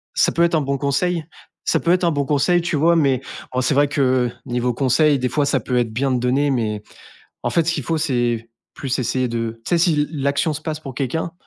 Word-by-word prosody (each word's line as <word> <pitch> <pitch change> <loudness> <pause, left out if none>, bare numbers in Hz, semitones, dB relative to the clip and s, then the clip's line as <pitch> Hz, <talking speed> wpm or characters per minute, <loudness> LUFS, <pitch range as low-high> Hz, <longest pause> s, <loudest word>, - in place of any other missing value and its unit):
ça - - +3
peut 170 - +2
être 170 - +2
un 155 - +3
bon 140 0 -1
conseil, 160 +5 0 0.4
ça - - +2
peut 170 - -2
être 180 0 +2
un 170 - +3
bon 145 -2 0
conseil, 155 +5 +2
tu 170 -1 -2
vois? 165 +4 +4
Mais 135 -6 +2 0.3
en 130 - 0
c'est 130 +3 +1
vrai 145 +1 +4
que 130 -3 +1 0.2
niveau 125 0 -1
conseil, 140 +4 +3
des 125 - -1
fois, 145 +3 0
ça - - +2
peut 125 - -3
être 115 -2 -1
bien 135 +4 0
de 125 - +1
donner, 135 +4 +1
mais 110 -4 -1 0.6
en - - -1
fait, 165 -2 +1
ce 170 - +2
qu'il 145 - -3
faut 160 +5 -1
c'est 120 -6 0 0.2
plus 135 -2 -3
essayer 130 0 0
de, 115 -1 -3
tu - - -4
sais, 175 - +3
si 170 0 +3
l 150 0 0
l'action 140 +1 0
se 155 - -6
passe 155 -2 -4
pour 135 -4 -8
quelqu'un, 160 +6 -2
140 Hz, 250 wpm, -21 LUFS, 125-155 Hz, 0.6 s, vois